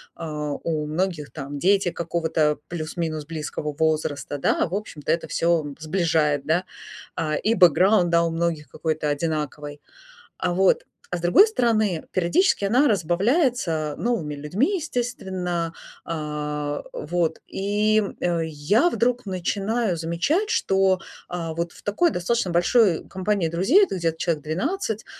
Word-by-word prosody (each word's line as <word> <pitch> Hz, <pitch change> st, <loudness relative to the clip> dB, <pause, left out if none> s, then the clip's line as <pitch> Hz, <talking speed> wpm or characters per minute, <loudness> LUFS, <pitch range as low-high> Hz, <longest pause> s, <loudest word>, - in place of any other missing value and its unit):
А, 150 Hz, -2 st, -4 dB
у 155 Hz, -2 st, -1 dB
многих 155 Hz, -1 st, -2 dB
там 145 Hz, -1 st, -6 dB
дети 195 Hz, +1 st, +3 dB
какого-то 160 Hz, -2 st, 0 dB
плюс-минус 160 Hz, -2 st, -4 dB
близкого 150 Hz, -1 st, -4 dB
возраста, 155 Hz, -3 st, 0 dB
да, 140 Hz, -, +1 dB
в 180 Hz, -, -4 dB
общем-то 155 Hz, -8 st, -4 dB
это 165 Hz, -1 st, 0 dB
всё 165 Hz, -1 st, +1 dB
сближает, 155 Hz, -3 st, +1 dB
да. 170 Hz, +4 st, +2 dB, 0.5 s
А, 155 Hz, -2 st, -1 dB
и 225 Hz, +8 st, +1 dB
бэкграунд, 180 Hz, +1 st, +5 dB
да, 170 Hz, 0 st, +4 dB
у 170 Hz, -, +1 dB
многих 165 Hz, -2 st, -1 dB
какой-то 155 Hz, -2 st, -2 dB
одинаковый, 150 Hz, -1 st, -3 dB, 0.6 s
а, 175 Hz, -, 0 dB
вот. 190 Hz, +1 st, +3 dB, 0.3 s
А 180 Hz, -, -2 dB
с -, -, -8 dB
другой 175 Hz, -, +6 dB
стороны, 220 Hz, -, +1 dB
периодически 190 Hz, -, +2 dB
она 250 Hz, +8 st, +4 dB
разбавляется 190 Hz, -, +1 dB
новыми 175 Hz, -12 st, -1 dB
людьми, 195 Hz, -, 0 dB
естественно, 190 Hz, -, -3 dB, 0.3 s
а, 150 Hz, -2 st, -3 dB
вот, 165 Hz, +1 st, -1 dB
и, 210 Hz, +2 st, +1 dB, 0.2 s
э, 175 Hz, -1 st, +1 dB
я 160 Hz, -, +2 dB
вдруг 245 Hz, -2 st, 0 dB
начинаю 195 Hz, +2 st, -1 dB
замечать, 175 Hz, -, 0 dB
что, 190 Hz, -, +2 dB, 0.3 s
а, 165 Hz, -2 st, -4 dB
вот 170 Hz, +1 st, -2 dB
в -, -, -16 dB
такой 270 Hz, +13 st, +2 dB
достаточно 185 Hz, -, 0 dB
большой 175 Hz, +1 st, +3 dB
компании 190 Hz, -1 st, 0 dB
друзей, 195 Hz, -, +4 dB
это 365 Hz, -, -5 dB
где-то 165 Hz, -2 st, -1 dB
человек 165 Hz, -4 st, -1 dB
12, 220 Hz, -, -2 dB
170 Hz, 135 wpm, -24 LUFS, 155-205 Hz, 0.6 s, другой